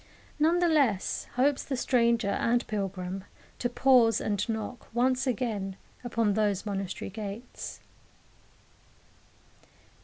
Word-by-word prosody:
None 325 +3 +4
the 350 0 +3
less 275 - +2
hopes 270 +2 +2
the 265 - -3
stranger 235 -4 +2
and 240 +3 +1
pilgrim 195 -2 -3 0.4
to 245 - 0
pause 240 -3 +4
and 205 +1 -1
knock 220 +2 -4
once 255 +2 +2
again 210 -6 -1 0.3
upon 230 -3 +1
those 205 -2 +1
monastery 195 -2 -4
gates. 215 +3 -7
230 Hz, 110 wpm, -29 LUFS, 200-250 Hz, 0.4 s, None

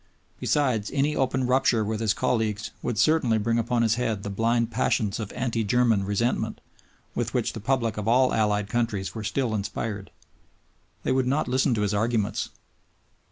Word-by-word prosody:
Besides, 125 -8 +1
any 145 +2 +1
open 130 -1 +1
rupture 125 -3 +2
with 110 0 -2
his 110 -2 +1
colleagues 110 -3 -1
would 120 -3 -2
certainly 125 -2 +3
bring 115 +2 +1
upon 115 +1 +1
his 110 -1 +3
head 110 -5 -1
the 100 - -4
blind 115 +3 +1
passions 110 -3 0
of 105 -3 -5
"anti 120 -3 -1
German" 115 -2 +2
resentment 105 +5 -1 0.5
with - - -2
which - - 0
the - - -6
public 115 -1 0
of 105 0 -3
all 125 +2 +4
allied 105 -2 +1
countries 110 -4 -1
were 110 - -5
still 120 +1 -1
inspired. 105 0 -3 0.9
They - - 0
would 130 -1 +2
not 140 +4 +1
listen 130 0 +2
to 105 - -1
his 105 0 0
arguments. 110 0 0
115 Hz, 170 wpm, -26 LUFS, 105-125 Hz, 0.9 s, all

